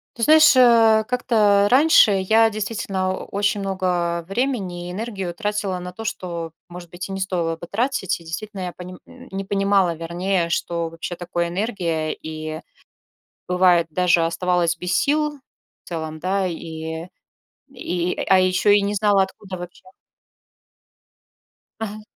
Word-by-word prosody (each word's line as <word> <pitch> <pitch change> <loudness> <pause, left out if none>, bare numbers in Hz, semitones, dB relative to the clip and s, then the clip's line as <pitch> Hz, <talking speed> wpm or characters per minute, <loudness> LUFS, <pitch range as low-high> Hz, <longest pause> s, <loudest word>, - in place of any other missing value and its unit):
Ты 230 - -4
знаешь, 310 +2 +7
а, 225 -3 +6
как-то 215 -5 +3
раньше 275 -4 +6
я 220 +4 +3
действительно 200 -3 -2
о - - -6
очень 200 0 0
много 180 -3 -1
времени 195 -6 -2
и - - -5
энергию 195 -4 -4
тратила 205 -2 -2
на 180 0 -7
то, 225 - -8
что, 170 -6 -4 0.2
может 175 0 -10
быть, 175 +2 -7
и 195 - -6
не 195 - -4
стоило 175 -3 -1
бы 165 - -9
тратить. 235 -4 -1
И 170 - -16
действительно, 195 +5 -6
я 180 -1 -4
пони 180 0 -9
н - - -15
не 195 0 -4
понимала, 195 -3 +2
вернее, 170 +2 -1
что 170 -1 -2
вообще 165 +2 -6
такое 175 0 -2
энергия, 170 -5 -2
и 155 0 -6 0.9
бывает 180 -2 +3
даже 175 0 +2
оставалось 170 0 0
без 180 +1 -3
сил, 300 0 0 0.5
в - - -32
целом, 160 -2 -5
да, 190 +3 0
и 160 -1 -5 0.6
и, 180 -9 -3
а 190 - +6
еще 185 +2 +3
и 205 - +5
не 200 +1 -1
знала, 205 -1 +3
откуда 190 0 -6
вообще 175 0 -10 2.0
Ага. 215 -1 -5
185 Hz, 150 wpm, -22 LUFS, 170-210 Hz, 2.0 s, знаешь